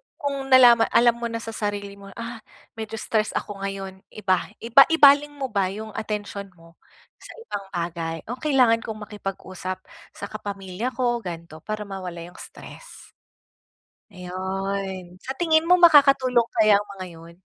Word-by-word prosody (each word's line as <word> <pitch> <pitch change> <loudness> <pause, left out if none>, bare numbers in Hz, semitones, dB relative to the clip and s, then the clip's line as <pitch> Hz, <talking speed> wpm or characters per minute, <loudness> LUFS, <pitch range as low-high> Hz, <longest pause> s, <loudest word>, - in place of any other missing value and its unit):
kung 275 -2 -4
nalama 245 -3 +7
alam 235 0 +3
mo 235 - -2
na 230 0 -5
sa 225 - -6
sarili 205 -2 -4
mo, 200 - -12
ah, 230 0 -7 0.4
medyo 220 0 -5
stress 215 0 -1
ako 205 -2 -4
ngayon, 195 -1 -5 0.2
iba 185 -4 0 0.2
iba 240 +4 +7
ibaling 290 -2 +5
mo 265 -4 -4
ba 195 -3 +1
yung 215 +3 -7
atensyon 205 -2 -5
mo 165 0 -20 0.4
sa - - -12
ibang 200 - -6
bagay, 165 -1 -3
o 250 - -6
kailangan 255 -6 +3
kong 220 -2 -7
makipag-usap 185 -2 -6 0.4
sa 200 - -6
kapamilya 200 +1 -5
ko 240 -2 0
gan'to 170 -5 -8
para 215 +4 -5
mawala 185 -4 -7
yung 175 +1 -13
stress. - - -12 1.0
Ayun, 190 0 -5
sa 265 - -4
tingin 320 -2 +3
mo 360 - +6
makakatulong 275 -7 +5
kaya 215 -2 +5
ang 205 - -9
mga 185 - -5
yun? 165 +1 -14
210 Hz, 155 wpm, -24 LUFS, 190-240 Hz, 1.0 s, nalama